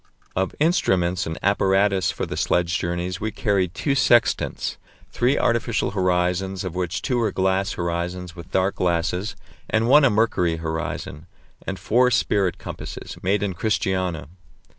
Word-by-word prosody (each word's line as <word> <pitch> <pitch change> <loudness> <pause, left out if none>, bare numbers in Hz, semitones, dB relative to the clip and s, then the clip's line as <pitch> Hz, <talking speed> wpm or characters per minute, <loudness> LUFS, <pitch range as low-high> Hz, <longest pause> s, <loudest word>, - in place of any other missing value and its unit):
Of 95 +1 -1
instruments 95 - +2
and 80 - -4
apparatus 100 -1 +2
for - - -3
the - - -5
sledge 90 0 +1
journeys 85 +1 -3
we 110 - -1
carried 95 -4 0
two 140 - 0
sextants, 120 -3 +2 0.3
three 125 +4 +2
artificial 115 -1 +1
horizons, 90 0 0
of 90 -3 -4
which 90 +1 -3
two 125 -2 0
were 110 -3 +1
glass 95 +1 0
horizons 85 +1 -3
with 85 0 -10
dark 95 +1 0
glasses, 90 +4 0 0.3
and 110 +1 +1
one 145 +4 +7
a 140 - +6
mercury 105 -6 +1
horizon, 80 -1 -5 0.4
and 95 - -3
four 125 +6 +3
spirit 100 -6 +1
compasses, - - -7
made 100 +2 +1
in 100 -2 -1
Christiania. 95 -5 -1
95 Hz, 145 wpm, -23 LUFS, 90-105 Hz, 0.4 s, one